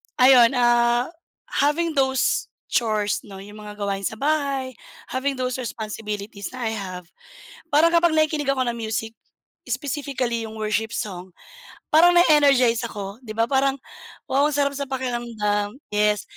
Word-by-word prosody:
ayun, 250 -1 +6
ah, 240 +2 +3 0.5
having 310 +4 +2
those 265 -3 +1 0.2
chores 215 -3 0
'no, 195 -3 -11
yung 205 +2 -11
mga 210 0 -9
gawain 200 -1 -2
sa 220 - -2
bahay, 280 -3 -1 0.4
having 275 +2 -1
those 250 -1 -1
responsibilities 210 -3 -5
na 240 -3 -3
I 220 - -2
have, 185 -4 -6 0.7
parang 320 +3 +5
kapag 340 -1 +4
nakikinig 310 -2 +1
ako 260 -1 0
ng 235 - -1
music, 225 0 -3 0.5
specifically 250 -2 -3
yung 220 0 -8
worship 215 +1 -1
song, 185 -4 -5 0.6
parang 345 +3 +6
na-energize 275 -8 +4
ako, 200 -1 -7
di 220 -4 -9
ba 230 +1 0
parang, 270 0 +2 0.6
wow 280 +2 +3
ang 300 - -1
sarap 280 -1 0
sa 280 - -3
pakiramdam 235 -5 -2 0.2
yes. 210 0 +2
240 Hz, 145 wpm, -23 LUFS, 215-275 Hz, 0.7 s, ayun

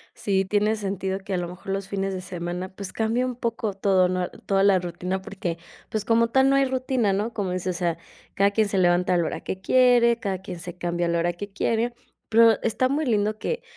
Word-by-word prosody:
Sí, 195 -2 0
tiene 210 +2 +1
sentido 195 -2 -3
que, 195 0 -6
a - - +1
lo 175 -1 -2
mejor, 180 +2 -12
los 195 0 -3
fines 195 -1 -2
de 185 - -4
semana, 180 0 -5
pues 190 0 -7
cambie 225 +3 0
un 255 -1 -2
poco 230 -3 -2
todo, 190 -2 +2
¿no? 180 -1 -1 0.2
Toda 195 -1 +2
la 200 -1 +5
rutina, 180 +1 -3
porque, 185 -3 -4 0.3
pues, 215 -2 -2
como 230 +1 +3
tal, 265 +3 +4
no 275 - +4
hay 275 - +4
rutina, 255 -5 0
¿no? 210 +4 -1
Como 200 -4 -2
dices, 180 0 -2
o - - -8
sea, 170 -2 0 0.4
cada 200 +1 +3
quien 215 +1 +2
se 200 - -1
levanta 180 0 +3
a - - +3
la 170 - +1
hora - - -3
que 190 - -5
quiere, 245 0 +4
cada 195 -4 -2
quien 180 -2 -7
se 175 +1 -6
cambia 175 -1 -1
a - - 0
la 170 0 +1
hora 175 +1 0
que 205 +4 -7
quiere, 230 +3 0 0.4
pero 225 -1 +5
está 255 +3 +1
muy 300 +3 0
lindo 215 -3 0
que, 480 - -3
195 Hz, 240 wpm, -24 LUFS, 180-225 Hz, 0.4 s, la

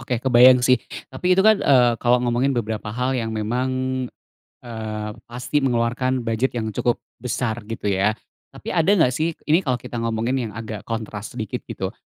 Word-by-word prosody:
oke, 125 -1 -2
kebayang 125 0 +6
sih. 125 +1 +4 0.3
Tapi 180 +8 0
itu 190 - +4
kan, 215 +1 +6
eee, 125 -3 +5
kalau 120 +1 +2
ngomongin 125 +3 +1
beberapa 110 -3 -3
hal 125 +3 -1
yang 115 -2 -2
memang, 115 +4 -1 1.0
eee, 110 -2 -5 0.2
pasti 125 +5 -1
mengeluarkan 125 0 0
bujet 115 +3 0
yang 110 -2 -3
cukup 120 +4 0 0.2
besar, 125 -2 -2
gitu 115 - -6
ya. 100 +2 +1 0.3
Tapi - - -7
ada 165 +3 +2
nggak 130 -7 +3
sih, 160 +5 -1
ini 160 +4 +3
kalo 130 -8 -1
kita 120 0 -6
ngomongin 115 +1 -1
yang - - -10
agak 110 -2 -6
kontras 110 -2 -5
sedikit, - - -4
gitu. - - -4
120 Hz, 175 wpm, -22 LUFS, 110-130 Hz, 1.0 s, kebayang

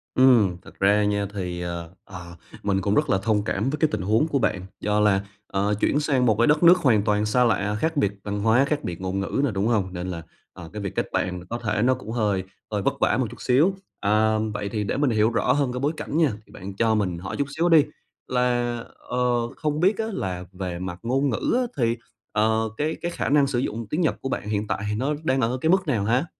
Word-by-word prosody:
Ừm, 115 -9 +5
thật - - -16
ra 100 +2 +4
nha 100 0 0
thì, 90 -3 -4
ờ, 85 -1 -5
ờ, 85 -3 -10 0.3
mình 95 -1 +1
cũng 100 +2 0
rất 150 -1 +2
là 95 - +3
thông 105 -1 +1
cảm 105 +3 -1
với 150 - -2
cái 155 - +4
tình 105 - -2
huống 110 - +2
của 140 -4 0
bạn. 95 -6 -1
Do 105 0 0
là, 100 -2 +3 0.3
ờ, 100 +2 0
chuyển 145 - +2
sang 140 -4 +1
một 110 -4 +4
cái 115 - +3
đất 150 +3 +3
nước 175 +2 +8
hoàn 125 - +3
toàn 105 -1 +1
xa 125 +4 +3
lạ, 105 -3 +1
khác 160 +3 -1
biệt 100 -8 +2
văn 105 0 -3
hóa, 115 +5 +4
khác 150 +1 -2
biệt 85 0 -5
ngôn 95 +1 -2
ngữ 100 +7 -1
nữa, 140 - +1
đúng 100 +3 0
hông? 100 -6 0
Nên 90 0 -4
là, 85 -2 -5 0.3
à, - - -10
cái 105 - -5
việc 100 -2 -5
kết - - -1
bạn 90 0 -1
mà 90 - -12
có 120 - -2
thể 110 -3 -1
nó 130 +3 +4
cũng 125 -4 -7
hơi 105 -5 0 0.3
hơi 105 -1 -1
vất - - +1
vả - - +2
một 130 - 0
chút 120 - -12
xíu. 150 +10 +3 0.2
À, 110 +1 +2 0.2
vậy 105 -1 -3
thì 105 0 -2
để 100 - -2
mình 145 -1 +2
hiểu 110 -1 +3
rõ 115 0 +1
hơn 140 -3 +1
cái 125 - -3
bối 145 +4 0
cảnh 150 - -3
nha. 160 -5 +3
Thì - - -21
bạn 95 0 -8
cho 110 +1 +2
mình 95 -5 -1
hỏi 95 +2 -6
chút 140 - 0
xíu 170 +2 +2
đi, 160 -3 +6 0.4
là, 120 -1 0 0.3
ờ, 125 - -2 0.4
không 150 -1 -2
biết 190 +5 +3
á, 225 - -1
là 90 - -3
về 90 -2 -5
mặt 90 -1 -5
ngôn 135 +4 +1
ngữ 115 - -1
á, 255 - +2 0.2
thì, 115 -1 +1 0.3
ờ, 110 +1 +1
cái 155 +2 -1
cái 175 - -2
khả - - -2
năng 140 0 +4
sử 130 -3 -1
dụng 115 -3 -3
tiếng 155 - -1
Nhật 160 - +1
của 135 - -3
bạn - - -2
hiện 105 0 -1
tại - - -1
thì 105 - -1
nó 135 +7 0
đang 135 -3 +1
ở 120 +3 0
cái 160 - +1
mức 190 -1 +3
nào 115 -8 +1
ha? 125 +7 +2
110 Hz, 260 wpm, -24 LUFS, 100-135 Hz, 0.4 s, nước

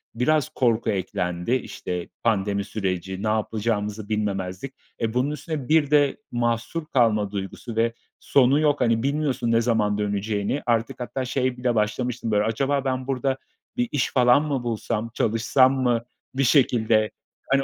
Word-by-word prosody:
biraz 140 +4 +2
korku 115 -2 +1
eklendi. 90 -1 -2
İşte, 90 -7 -4
pandemi 100 -3 +1
süreci, 95 -1 -3
ne - - 0
yapacağımızı 105 -1 -1
bilmemezlik. 100 +2 -2 0.3
E, 110 -1 0
bunun 130 +4 +1
üstüne 150 -2 -5
bir 155 -2 +3
de 145 -2 +4
mahsur 120 +6 -1
kalma 110 -8 +2
duygusu 100 +3 -6
ve 115 +1 +1 0.3
sonu 135 +1 +3
yok. 150 -2 +2
Hani, 115 -2 +2
bilmiyorsun 140 -4 0
ne 115 0 +4
zaman 110 -3 +1
döneceğini. 105 +4 -1
Artık 115 0 0
hatta 130 +1 -3
şey 130 0 -1
bile 125 -1 0
başlamıştım, 115 +2 -1
böyle, 105 0 +3
"Acaba 135 +5 0
ben 130 -1 -2
burada 135 0 0 0.4
bir 245 -1 0
iş 140 -4 0
falan 125 +2 +5
mı 140 -5 -2
bulsam, 115 -1 -2
çalışsam 120 +4 +3
mı 120 -2 +2 0.3
bir 135 - +2
şekilde? 115 -5 +3 0.4
Hani 135 0 +3
115 Hz, 150 wpm, -24 LUFS, 105-130 Hz, 0.4 s, falan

